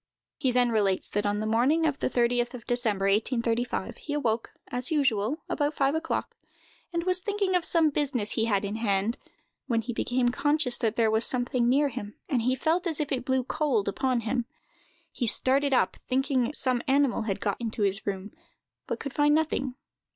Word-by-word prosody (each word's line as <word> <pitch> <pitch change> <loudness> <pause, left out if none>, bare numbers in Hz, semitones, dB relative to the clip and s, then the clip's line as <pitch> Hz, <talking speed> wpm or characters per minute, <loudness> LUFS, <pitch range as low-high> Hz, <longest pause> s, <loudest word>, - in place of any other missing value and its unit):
He 270 -4 +1
then 245 -1 +3
relates 200 -4 +2
that, 205 0 0
on 205 0 0
the - - -2
morning 255 +9 +2
of 295 -3 0
the - - 0
30th 240 0 +1
of 235 - -10
December, 225 -5 0
1835, 230 +2 0
he 295 - -6
awoke, 235 -6 -1 0.2
as 245 0 -2
usual, 270 -2 +1
about 295 0 -1
five 275 0 +2
o'clock, 320 +1 -2 0.6
and 340 -1 -1
was 365 0 +1
thinking 405 -1 -1
of 355 - +2
some 325 -3 +2
business 265 -8 -1
he 225 - +1
had 205 -3 +1
in 205 +2 -3
hand, 210 +1 0 0.5
when 230 -3 +1
he 240 +2 -5
became 245 +1 +1
conscious 290 -1 +1
that 225 -3 0
there 225 -2 +3
was 220 +1 +2
something 245 0 +2
near 285 +3 +3
him, 215 -5 -7
and 255 -5 +1
he 255 +3 +1
felt 330 +7 0
as 320 -4 -1
if 300 -1 -2
it 255 -2 -1
blew 260 -1 +1
cold 265 -6 0
upon 250 +4 0
him. 235 +1 -2 0.6
He 240 - -2
started 275 +5 +2
up, 255 - +2
thinking 265 -1 +1
some 255 -2 0
animal 270 -3 +2
had 195 - -1
got 200 +3 -2
into 225 -2 -2
his 200 +1 0
room, 195 +1 -3 0.6
but - - -3
could 280 -2 -6
find 295 0 +4
nothing. 275 -5 0
250 Hz, 195 wpm, -27 LUFS, 225-285 Hz, 0.6 s, find